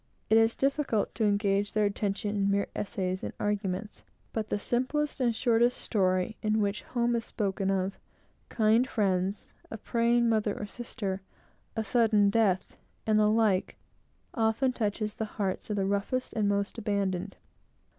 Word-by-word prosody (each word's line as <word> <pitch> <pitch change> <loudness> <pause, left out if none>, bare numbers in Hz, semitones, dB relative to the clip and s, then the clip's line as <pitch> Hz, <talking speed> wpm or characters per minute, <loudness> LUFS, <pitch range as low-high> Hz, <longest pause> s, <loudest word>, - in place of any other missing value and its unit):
It 220 - +7
is 225 0 +3
difficult 275 -6 0
to 225 - 0
engage 205 0 +1
their 215 -1 +2
attention 205 0 -1
in 200 -1 +1
mere 200 0 +2
essays 185 -2 -2
and - - -5
arguments, 205 0 -2 0.3
but 220 -1 -2
the - - 0
simplest 260 +8 -1
and 240 -3 +2
shortest 240 +1 +3
story, 185 0 0
in 215 0 +1
which 205 0 0
home 240 -1 0
is 230 - -1
spoken 195 -3 -2
of, 190 0 -1 0.5
kind 225 +3 +3
friends, 195 -2 0 0.2
a 220 - -6
praying 235 +2 +2
mother 215 -2 +1
or - - -3
sister, 200 -3 -4 0.5
a 220 - -1
sudden 215 -3 +3
death, 200 -4 +1 0.3
and 215 -1 +3
the 210 0 +4
like, 215 -4 +2 0.6
often 230 +2 +1
touches 215 -2 -1
the 220 - -3
heart 195 -1 -2
of 210 - -1
the 195 -1 0
roughest 200 +6 -1
and 210 -2 +1
most 200 +3 -1
abandoned. 200 -3 -1
210 Hz, 155 wpm, -29 LUFS, 200-230 Hz, 0.6 s, It